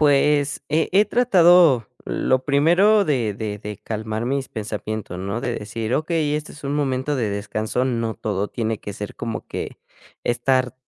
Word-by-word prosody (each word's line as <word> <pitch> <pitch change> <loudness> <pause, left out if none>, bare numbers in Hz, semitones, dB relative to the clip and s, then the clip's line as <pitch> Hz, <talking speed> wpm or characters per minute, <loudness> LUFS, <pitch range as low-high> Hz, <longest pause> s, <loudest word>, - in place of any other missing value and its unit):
Pues, 145 0 +3
he 155 +2 +1
he 205 +2 +6
tratado 175 - +5 0.2
lo 130 0 0
primero 175 +9 +4
de 120 - 0
de 105 -1 -4
de 105 -1 -6
calmar 110 +1 -4
mis 135 +1 -1
pensamientos, 110 -3 -5
¿no? 100 +5 -3
De 120 -2 -2
decir: 110 +2 -3
"Okey, 155 -2 0
este 150 0 -4
es 145 - -13
un 140 +1 -1
momento 140 0 0
de 115 -6 -1
descanso, 110 +4 -2
no 115 -3 -1
todo 105 -1 -2
tiene 110 -2 -2
que 100 - -6
ser 105 +1 -7
como 115 -1 -5
que - - -6 0.5
estar 125 +1 +1
125 Hz, 165 wpm, -22 LUFS, 110-150 Hz, 0.5 s, he